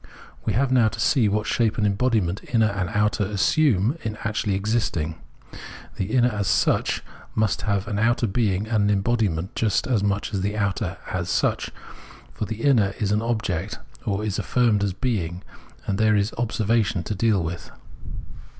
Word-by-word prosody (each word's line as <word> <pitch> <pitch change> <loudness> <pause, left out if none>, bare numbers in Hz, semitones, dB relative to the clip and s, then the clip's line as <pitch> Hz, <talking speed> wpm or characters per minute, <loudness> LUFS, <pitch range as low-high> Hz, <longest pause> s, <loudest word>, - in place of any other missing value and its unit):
We 110 - 0
have 130 +5 +1
now 125 -4 +5
to 115 +1 -4
see 115 -2 +3
what 105 +1 0
shape 115 0 +1
and 105 - +1
embodiment 100 -3 +1
inner 110 -3 +3
and 95 -3 -2
outer 105 +2 +1
assume 115 - +2
in 110 -1 -4
actually 105 -2 -1
existing. 100 -6 -1 0.8
The 95 - -1
inner 125 +4 +2
as 105 -2 -2
such - - +1 0.3
must 110 -2 +1
have 100 -1 -1
an 105 -1 -2
outer 120 +2 +2
being 105 -1 0
and 110 -2 +2
an - - +2
embodiment, 100 -4 0
just 110 -3 +1
as 115 -6 +1
much 100 +1 -1
as 95 - -1
the 105 +2 -2
outer 100 -2 -1
as - - -2
such; - - 0 0.6
for - - -3
the 110 +1 -6
inner 110 -9 +3
is 105 -3 -1
an 105 +1 +2
object, 105 -5 -2 0.3
or 105 +1 -1
is 105 -2 -2
affirmed 115 -5 +2
as 100 -2 0
being, 95 -6 -2 0.4
and 100 +1 -1
is 105 -2 +3
there - - -11
for - - -3
observation 110 -4 +1
to 105 - -3
deal 105 -2 +2
with. 85 +1 -5
105 Hz, 175 wpm, -24 LUFS, 100-115 Hz, 0.8 s, now